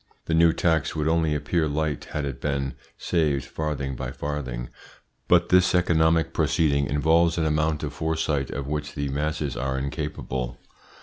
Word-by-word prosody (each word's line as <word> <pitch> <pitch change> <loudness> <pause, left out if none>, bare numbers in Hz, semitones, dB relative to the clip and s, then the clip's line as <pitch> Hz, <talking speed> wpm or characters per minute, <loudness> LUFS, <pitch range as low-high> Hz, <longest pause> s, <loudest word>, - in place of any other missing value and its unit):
The 80 - -1
new 85 +1 +6
tax 80 -2 +1
would 75 -1 0
only 80 -2 +2
appear 75 +2 0
light 75 0 -2
had 75 -2 -3
it 70 -3 -5
been 70 -2 -1 0.2
saved 75 -5 0
farthing 70 -4 -3
by - - -4
farthing, 65 -5 -4 0.6
but 85 0 +4
this 90 0 +4
economic 80 -2 +3
proceeding 75 -3 +2
involves 80 +4 +3
an 80 - +1
amount 75 0 +1
of 75 -1 -3
foresight 75 -3 -1
of 70 - -4
which 75 0 -4
the 70 -1 -2
masses 75 -1 -2
are 65 +2 -2
incapable. 65 -3 -4
75 Hz, 160 wpm, -25 LUFS, 70-80 Hz, 0.6 s, new